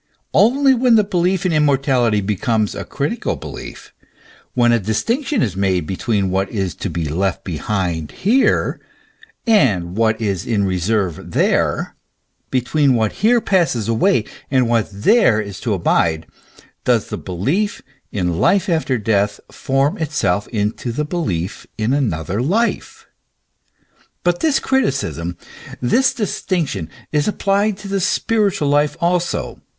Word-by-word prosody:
Only 265 +5 +4
when 245 -1 +4
the 215 - +5
belief 185 -1 0
in 180 - +1
immortality 135 -7 +2
becomes 105 +2 0
a - - -5
critical - - -2
belief, - - -9 0.6
when 120 -1 +4
a 120 - +3
distinc 225 - -1
tion 280 -9 +1
is 100 -5 -2
made 95 -4 0
between 100 +1 -1
what 95 +1 0
is 95 -6 -2
to 100 - -3
be 85 -1 -3
left 90 +5 -1
behind 85 -2 -2
here, 245 +8 +1 0.7
and 105 - +2
what 110 0 +1
is 100 -6 -1
in 105 -4 +1
reserve 95 -2 -1
there, - - +1 0.5
between 130 +2 +2
what 110 -2 +1
here 235 +3 +5
passes 170 - +1
away, 115 0 +2 0.2
and 130 -3 +2
what 115 -2 +1
there 110 - +3
is 100 -3 -5
to 115 - -1
abide, 80 -2 +1 0.6
does - - +1
the - - -4
belief 140 - -2 0.3
in 90 -4 -1
life 200 0 +3
after 160 -6 +1
death 100 -2 0
form 135 +3 0
itself 145 - 0
into 110 +2 -2
the 150 +6 -2
belief 105 - -3
in 110 +3 0
another 100 - -1
life; 210 - -1 1.2
but 175 0 +1
this 310 -4 +2
criticism, 135 - -1 0.4
this 245 - +3
distinction, 180 - -2 0.2
is 150 -1 +1
applied 200 0 +1
to 200 -1 -9
the 195 -1 -1 0.2
present 210 -4 +1
life 145 +1 +2
also. 175 +1 -1
120 Hz, 135 wpm, -19 LUFS, -, 1.2 s, the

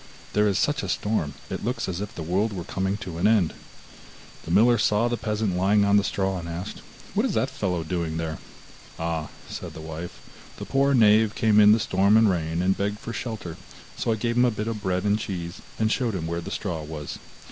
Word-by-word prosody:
There 105 0 +3
is 100 -1 +1
such 145 +3 +1
a - - -4
storm, 85 -10 -1 0.2
it - - -4
looks 125 +4 -2
as 95 0 -3
if 105 - -6
the 80 - -5
world 100 +7 0
were 90 -3 -4
coming 95 +2 -2
to 85 -3 -6
an - - +4
end.' 105 -7 +3 0.9
The - - -8
miller 115 +6 +5
saw 105 +2 +3
the 120 - 0
peasant 105 -4 -1
lying 100 +3 +3
on 100 0 +5
the 100 - +3
straw, 95 -2 -1
and 85 0 -7
asked, 90 +5 -6 0.3
'What - - +2
is - - 0
that - - +1
fellow 90 -3 -1
doing 80 -1 -2
there?' 80 -1 -3 0.6
'Ah,' 80 -2 -2 0.2
said - - -7
the - - -7
wife, 80 +2 -7 0.4
'the - - -6
poor 140 0 +2
knave 110 -1 +5
came 110 -2 +4
in 105 0 +8
the 110 - +5
storm 100 +1 +3
and 110 -3 +5
rain, 85 0 -1
and 95 +1 +3
begged 105 +1 -1
for 115 +1 -7
shelter, 110 -10 -5 0.4
so - - -1
I - - +2
gave 115 +2 -1
him 125 - +6
a - - +4
bit 105 -1 -3
of 110 -2 -3
bread 90 -2 0
and 105 +1 +2
cheese, 85 -5 -5 0.2
and 110 0 +1
showed 120 -5 0
him 85 -3 -3
where 85 +1 -2
the 90 - -7
straw 90 -5 -3
was. 75 -1 -6
100 Hz, 230 wpm, -25 LUFS, 85-110 Hz, 0.9 s, in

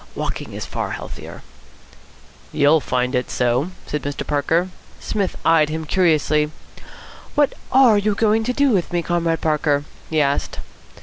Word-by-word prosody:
Walking - - -4
is - - -5
far - - -4
healthier." - - -8 1.1
"You'll 150 +2 +4
find 125 0 -1
it 125 -1 -1
so," 125 +6 0 0.2
said 150 - -3
Mr. 145 0 -4
Parker. 160 +5 +1 0.3
Psmith 200 -3 -2
eyed 155 -2 +4
him 160 +1 -4
curiously. 155 -3 +2 0.9
"What 290 -2 +3 0.2
are 250 -5 +6
you 205 0 0
going 220 +1 +2
to 250 - +1
do 280 0 +3
with 185 -5 0
me, 175 -1 0
Comrade 165 -1 0
Parker?" 150 -2 +1 0.3
he 155 - +1
asked. 140 -1 0
160 Hz, 145 wpm, -21 LUFS, 145-200 Hz, 1.1 s, are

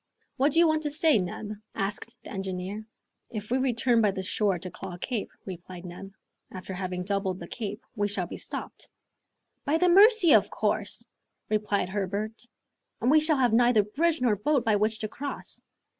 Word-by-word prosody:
"What 275 +3 +3
do - - +2
you 340 0 +7
want 315 0 +2
to 300 - -1
say, 305 -3 +4
Neb?" 190 +3 -4 0.2
asked 195 +1 -3
the - - -10
engineer. 190 +2 -4 0.5
"If 215 0 -6
we 255 - +2
return 240 -2 +2
by 210 - +4
the 190 -1 -3
shore 195 0 +1
to 180 +1 -7
Claw 180 0 -7
Cape," 225 +3 -3 0.2
replied 180 -1 -8
Neb, 185 +2 -9 0.4
"after 185 +1 -7
having 180 -1 -3
doubled 195 -1 -1
the - - -8
Cape, 210 -1 -5
we 205 -2 +1
shall 195 -3 -1
be - - -7
stopped - - -7 0.4
" - - -53
"By 305 +3 +3
the 360 +2 +3
Mercy! 400 -1 +7
of - - +5
course," - - -1 0.4
replied 210 -3 0
Herbert, 205 +4 -3 0.5
"and 245 +4 +2
we 310 - +7
shall 310 -1 +2
have 245 -4 +3
neither 240 -2 +5
bridge 310 +9 0
nor 240 -4 +3
boat 250 +5 +1
by 220 -2 +3
which 215 +2 +1
to 215 - -1
cross." 280 +6 -7
215 Hz, 190 wpm, -27 LUFS, 195-265 Hz, 0.5 s, you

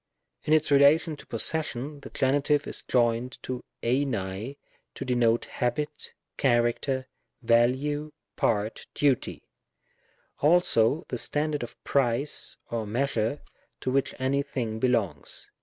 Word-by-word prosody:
In 155 - +3
its 155 -1 +3
relation 145 +3 +5
of 145 - -12
possession, 145 +2 -1
the - - -10
Gen. 135 +2 +1
is 145 -1 +1
joined 120 +1 +1
to 130 -1 -4 0.2
tlvac 115 -2 -1 0.4
to - - -5
denote 120 -2 +2
habit, 150 +4 -3 0.2
character, 130 +1 +1 0.4
value, 130 +6 +2 0.2
part, 105 0 0
duty; 140 -4 +1 1.0
also 150 -3 +4
the 125 - -2
standard 150 +2 -1
of 120 - -6
price, 135 +1 0
or 115 -2 -2
measure 120 +2 -1 0.4
to 130 - -1
which 135 +1 0
any 135 +2 +1
thing 120 -6 -3
belongs. 110 - -1
130 Hz, 115 wpm, -27 LUFS, 115-145 Hz, 1.0 s, relation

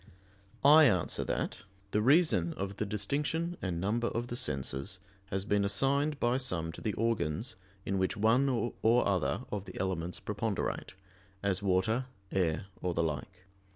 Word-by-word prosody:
I 155 +2 +9
answer 95 - +2
that, - - -2 0.3
The 105 - +2
reason 130 - +4
of 100 +1 -4
the 105 - -2
distinction 145 - -1
and 90 -3 -2
number 110 +6 0
of 120 +1 -3
the 120 - -3
senses 75 - -1 0.3
has 95 0 -2
been 105 -1 +2
assigned 140 +9 +1
by 120 +2 +2
some 90 -11 -1
to - - -11
the 105 - -1
organs 115 - -1 0.3
in 95 -1 0
which 95 +4 0
one 115 +6 +3
or 120 -1 +2
other 95 -5 0
of 100 -2 -3
the - - -8
elements 90 -2 -2
preponderate, - - -3 0.5
as 100 -1 0
water, 100 +6 +1 0.2
air, 90 -2 0 0.2
or 90 -2 -1
the 85 - +2
like. 80 +5 -4
100 Hz, 155 wpm, -31 LUFS, 90-120 Hz, 0.5 s, I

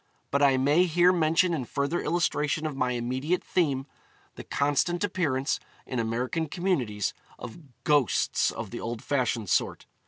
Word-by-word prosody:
But 140 - +1
I 135 -2 +5
may 145 +7 +4
here 175 +1 +4
mention 170 +1 +2
in 150 -6 -1
further 140 +7 -1
illustration 155 -2 0
of 155 -3 -3
my 125 -2 0
immediate 130 +8 -1
theme, 140 -7 0 0.5
the - - -9
constant 145 +6 0
appearance, 150 -9 0 0.3
in 130 - -3
American 125 +8 -1
communities, 130 - -1 0.2
of 125 +5 -9 0.2
ghosts 145 -8 +2
of - - -6
the - - -5
old 115 0 -5
fashioned 120 -7 -1
sort. - - 0
145 Hz, 150 wpm, -27 LUFS, 125-170 Hz, 0.5 s, I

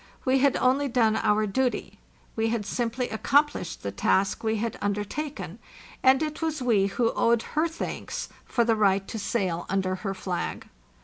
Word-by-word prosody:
We 265 0 +3
had 280 0 +3
only 270 +3 +2
done 230 -4 +2
our 215 -1 +2
duty; 250 +5 -1 0.4
we 225 0 +1
had 225 -2 -1
simply 240 +3 -2
accomplished 285 - +1
the 100 - -2
task 190 - +1
we 220 0 +1
had 225 +1 -3
undertaken; 205 - -3 0.4
and 265 +3 +5
it 305 +1 -4
was 320 -2 -1
we 225 -6 +3
who 230 +4 +1
owed 230 -1 +2
her 310 +2 +2
thanks 330 - -5 0.2
for 235 - +1
the 230 -1 +2
right 195 -2 +2
to 225 - -5
sail 190 -5 -1
under 190 -1 0
her 195 0 -4
flag. 185 -2 -4
225 Hz, 170 wpm, -26 LUFS, 200-260 Hz, 0.4 s, and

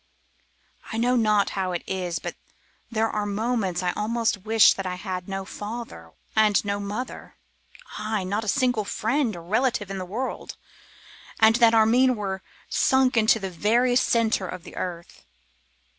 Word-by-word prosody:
'I 225 - -3
know 245 +2 +2
not 215 -3 +2
how 185 -2 -2
it 175 - -3
is, 180 -3 -3
but - - -5 0.6
there 225 -1 +1
are 210 -1 -2
moments 205 -4 -1
I 180 - +1
almost 220 -2 -1
wish 220 -1 +6
that 195 -1 -5
I 180 - -3
had 185 -1 -5
no 195 0 -4
father 205 - -8 0.2
and 215 -2 +3
no 200 0 -1
mother; 210 +5 -6 0.6
ay! 215 -2 -2
not 200 +4 -2
a - - -7
single 245 0 +1
friend 225 +3 -1
or 170 - -9
relative 220 +1 0
in 195 - -4
the - - -3
world, 220 +9 -5 0.8
and 220 +1 +6
that 230 -2 +5
Armine 245 +4 +4
were 195 -3 -4 0.3
sunk 265 -1 +2
into 225 0 +4
the 195 -3 -5
very 235 +8 +2
centre 230 -5 +2
of 180 -1 -7
the - - -12
earth. 170 -2 -6
215 Hz, 160 wpm, -25 LUFS, 190-230 Hz, 0.8 s, wish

